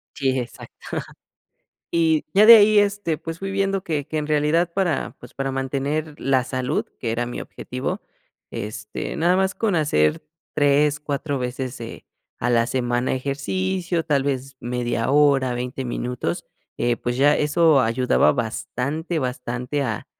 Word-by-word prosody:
Sí, 135 -1 0
exacto. 120 - -8 1.2
Y 160 -2 +2
ya 210 +2 +7
de 230 0 +12
ahí, 210 0 +6
este, 200 -6 +1
pues, 165 0 -6
fui 195 0 -3
viendo 195 -1 0
que 150 -5 -2
que 155 - -5
en 150 - -2
realidad 155 +3 +2
para, 180 -6 -1
pues, - - -14
para 135 0 -2
mantener 140 +3 -2
la 130 -2 +2
salud 130 0 -2
que 115 - -2
era 120 +1 -1
mi 120 - -5
objetivo, 65 - -5 0.5
este, 105 +1 -5
nada 175 +3 +3
más 190 0 +1
con 215 -5 0
hacer 75 - +2 0.3
3, 145 +1 +3
4 145 -1 -2
veces, 125 0 -4
eh, 115 - -8 0.3
a 120 - -1
la 115 -1 +3
semana 120 -1 0
ejercicio, 170 +6 -2
tal 140 -3 +2
vez 135 -1 -3
media 120 0 -1
hora, 140 -3 +4
20 125 +2 -4
minutos, 120 -7 -3 0.3
eh, 120 -1 +1
pues, 120 0 -3
ya 145 +2 +4
eso 150 -1 +4
ayudaba 125 +2 +3
bastante 140 +7 -3
bastante 125 +1 -3
a - - -3
140 Hz, 150 wpm, -23 LUFS, 125-160 Hz, 1.2 s, de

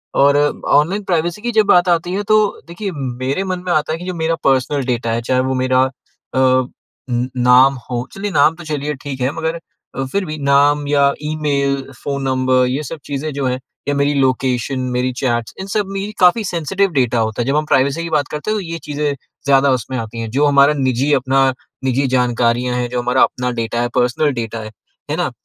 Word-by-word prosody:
और 140 +1 +5 0.3
online 175 +8 +2
privacy 175 +1 -1
की 240 - -2
जब 215 -2 +3
बात 180 -1 +4
आती 175 +1 +1
है, 205 - -1
तो 215 0 +2
देखिए, 185 +3 -5
मेरे 135 +3 -3
मन 185 -2 -3
में 180 - -1
आता 155 0 +1
है - - -2
कि 180 - -8
जो 185 - -3
मेरा 165 0 0
पर्सनल 135 0 +1
डाटा 120 -2 -1
है, 115 +1 -1
चाहे 130 +2 0
वो 130 0 -1
मेरा 130 0 +2 0.5
अ 130 -1 +3 0.7
नाम 125 +2 +6 0.2
हो, 125 0 -3
चलिए 205 +1 -4
नाम 150 0 +4
तो 175 - -11
चलिए 150 -1 -2
ठीक 135 -2 -6
है, 130 +2 +1
मगर 165 +1 -3 0.5
फिर 200 -1 0
भी 155 -2 -5
नाम 145 +1 +3
या 140 -1 +3
ईमेल, 145 -2 0 0.3
फ़ोन 140 -1 -2
नंबर, 130 -1 +2
ये 135 +4 -2
सब 155 +2 -7
चीज़ें 145 +2 -3
जो 140 -1 -2
हैं, 125 0 -1 0.3
ये 145 - +1
मेरी 140 +1 +1
लोकेशन, 130 -1 0 0.2
मेरी 125 +1 0
चैट्स 120 -3 -1
इन 190 - -5
सब 205 0 0
में 195 +2 -3
काफ़ी 180 +5 +5
सेंसिटिव 190 +2 0
डाटा 125 -4 +1
होता 110 +1 -1
है। - - -1
जब 135 - +1
हम 155 0 +1
प्राइवेसी 140 +2 +1
की 170 - -4
बात 150 -3 +1
करते 150 +8 -3
हैं, 215 - 0
तो - - -2
ये 165 -2 -5
चीज़ें 145 0 -2 0.3
ज़्यादा 140 0 +4
उसमें 130 +3 -5
आती 115 -1 -5
हैं, 115 -1 -4
जो 140 +5 +2
हमारा 140 0 +5
निजी, 130 +1 +1
अपना 135 0 +3 0.3
निजी 135 +1 +1
जानकारियाँ 125 0 +1
हैं, 125 0 -1
जो 125 0 -2
हमारा 125 +1 +1
अपना 125 0 -1
डाटा 115 +1 -2
है, 120 - -1
पर्सनल 125 +4 +2
डाटा 115 0 -5
है, 110 - -8 0.4
है - - -1
ना? - - -1
140 Hz, 210 wpm, -18 LUFS, 130-160 Hz, 0.7 s, नाम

